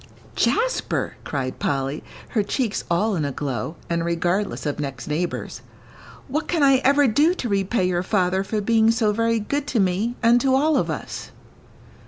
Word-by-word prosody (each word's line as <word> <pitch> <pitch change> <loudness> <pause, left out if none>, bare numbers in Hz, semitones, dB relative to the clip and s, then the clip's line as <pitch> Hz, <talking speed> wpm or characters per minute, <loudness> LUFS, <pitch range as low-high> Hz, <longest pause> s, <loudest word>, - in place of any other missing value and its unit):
"Jasper," - - 0
cried 130 -3 -4
Polly, 135 +1 -2 0.3
her 220 - +1
cheeks 215 +1 -1
all 200 +5 +1
in 160 - -1
a 140 - -1
glow, 140 +3 -4
and 170 0 -1
regardless 175 +4 -1
of 145 0 -2
next 135 -4 -5
neighbours, 165 +4 -3 0.7
"what 305 +3 -2
can 335 -4 +1
I 275 -1 +6
ever 280 +2 +4
do 295 +9 +3
to 255 - -3
repay 195 -1 +1
your 175 -1 0
father 185 -1 +1
for 210 +2 -2
being 225 +1 +3
so 225 -2 +2
very 230 +1 +1
good 285 +7 -2
to 245 - 0
me 195 +5 +1
and 235 +1 +5
to 265 0 +3
all 305 +3 +3
of - - +1
us?" - - -5
210 Hz, 175 wpm, -23 LUFS, 170-250 Hz, 0.7 s, I